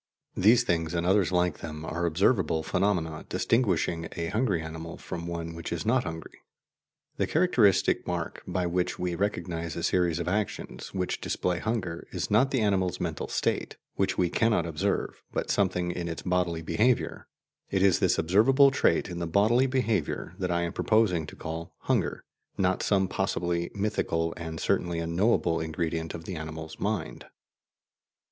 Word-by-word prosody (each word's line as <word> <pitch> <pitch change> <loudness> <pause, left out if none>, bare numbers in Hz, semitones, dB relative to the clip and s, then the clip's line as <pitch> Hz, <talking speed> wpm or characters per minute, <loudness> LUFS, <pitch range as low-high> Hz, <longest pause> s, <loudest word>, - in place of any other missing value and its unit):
These 115 +6 +5
things 85 -5 0
and 85 0 0
others 95 0 +3
like 90 -3 +1
them 75 -1 -6
are 85 +2 -1
observable 85 -2 +2
phenomena 90 -5 0
distinguishing 90 -4 +1
a 85 -1 -3
hungry 110 -6 +1
animal 80 +1 -7
from 85 0 -6
one 85 -1 -4
which 85 0 -6
is 85 -2 -3
not 125 +1 +2
hungry. 80 -2 -7 0.8
The - - +1
characteristic 115 - +3
mark - - -3
by 90 -1 -1
which 90 +1 -1
we 90 -1 -2
recognize 85 -3 -2
a 85 - -4
series 90 -2 +2
of - - -3
actions 100 +2 -3
which 90 -1 -2
display 90 -1 -1
hunger 95 -7 -3
is - - -3
not 110 +6 +4
the 130 -4 0
animal's 95 -4 +1
mental - - -3
state, - - -1 0.2
which - - 0
we 90 -2 +2
cannot 110 -7 +2
observe, 80 -3 -2
but - - -2
something 90 -3 +1
in 85 -1 -4
its 80 -1 -5
bodily 90 -3 0
behaviour; 115 +8 +1 0.4
it 95 -1 +1
is 95 -3 +4
this - - +3
observable 115 - +5
trait 135 - +2
in 85 -1 -5
the 85 - -2
bodily 110 +9 +3
behaviour 115 - -1
that 90 -1 -1
I 85 0 +1
am 85 - -3
proposing 95 -8 +2
to - - -10
call 80 +2 -6
"hunger," - - 0 0.3
not 95 -1 +1
some 95 -2 +2
possibly 85 -2 -1
mythical 85 -5 0
and 80 -1 -6
certainly 85 -1 0
unknowable 85 0 +1
ingredient 80 0 -3
of 80 - -7
the 90 - -5
animal's 80 0 -7
mind. 105 +1 -3
90 Hz, 165 wpm, -28 LUFS, 85-100 Hz, 0.8 s, These